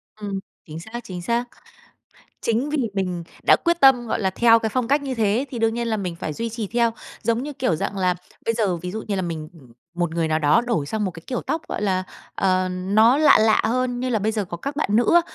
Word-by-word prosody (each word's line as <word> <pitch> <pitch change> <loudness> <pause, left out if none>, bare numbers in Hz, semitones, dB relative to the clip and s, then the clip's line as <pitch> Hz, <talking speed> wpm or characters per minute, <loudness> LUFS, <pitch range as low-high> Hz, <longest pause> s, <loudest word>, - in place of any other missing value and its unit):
Ừm, 205 -2 -4 0.3
chính 155 0 -8
xác, 220 +7 -7
chính 180 -5 -7
xác. 235 +6 0 1.0
Chính 235 +6 0
vì 300 - -1 0.2
mình 180 -3 -2 0.2
đã - - +6
quyết 340 -1 0
tâm, 255 -3 +6
gọi 225 - -1
là, 190 -2 +1
theo 230 +4 +5
cái 225 - -1
phong 250 0 -1
cách 285 +2 +2
như 270 -2 -3
thế 225 +3 +1
thì 245 - -5
đương 225 0 +1
nhiên 235 0 -2
là 220 - 0
mình 180 -4 -4
phải 160 - -4
duy 230 +9 -3
trì 225 -1 -4
theo, 235 +2 +2 0.3
giống 230 +1 +1
như, 295 - -5
kiểu 255 - 0
dạng 195 - -3
là, 180 -1 +2 0.3
bây 230 - +1
giờ 205 -6 +1
ví 180 +2 -6
dụ 220 +3 -5
như 205 - 0
là 190 - -1
mình 160 -3 -4 0.5
một 175 -1 -1
người 165 -2 0
nào 155 - +1
đó 150 +6 +4
đổi 235 -12 -1
sang 215 +7 -2
một 190 - -1
cái 165 -1 -12
kiểu 250 - -2
tóc, 315 +4 -2
gọi - - -3
là, 190 -2 +1 0.3
ờ, 185 -1 +1
nó 205 +8 +3
lạ 310 - +6
lạ 220 0 +4
hơn, 250 +1 0
như 255 - -1
là 235 -3 +1
bây 215 +2 0
giờ 215 -2 -1
có 175 -1 -6
các 280 +10 -5
bạn 305 - 0
nữ 240 +7 +3
á 345 - +8
220 Hz, 260 wpm, -23 LUFS, 185-240 Hz, 1.0 s, á